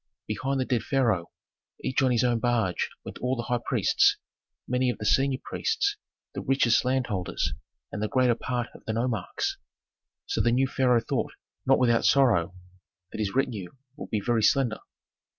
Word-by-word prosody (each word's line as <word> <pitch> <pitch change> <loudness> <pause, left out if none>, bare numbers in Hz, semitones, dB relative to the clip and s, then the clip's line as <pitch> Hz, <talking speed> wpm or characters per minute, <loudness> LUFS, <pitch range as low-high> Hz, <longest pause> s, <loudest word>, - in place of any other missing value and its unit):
Behind 135 +6 -2
the 130 - 0
dead 120 -3 0
pharaoh, 115 - +1 0.5
each 130 - 0
on 130 - +3
his 120 -2 +2
own 120 -2 +2
barge, 115 -7 0 0.2
went - - -8
all 125 +1 0
the 120 - -3
high 120 0 -1
priests, - - +3 0.5
many 125 0 +1
of 125 - -2
the 105 - -6
senior 135 +4 +3
priests, 415 -3 0 0.4
the - - -4
richest 125 -3 +3
landholders, 125 -8 -1 0.4
and 105 - -5
the 110 - 0
greater 125 +1 +3
part 120 0 -3
of - - -15
the 110 - -2
nomarchs. 115 0 -2 0.7
So - - 0
the 120 - +2
new 130 +3 +3
pharaoh 125 -3 +2
thought, - - -2 0.3
not 135 - +6
without 120 -2 +3
sorrow, 105 -11 +3 0.6
that - - -7
his 105 0 -2
retinue 110 -9 -1 0.2
would 150 - -8
be 110 - 0
very 120 -2 +2
slender. 120 0 +2
120 Hz, 170 wpm, -27 LUFS, 110-130 Hz, 0.7 s, not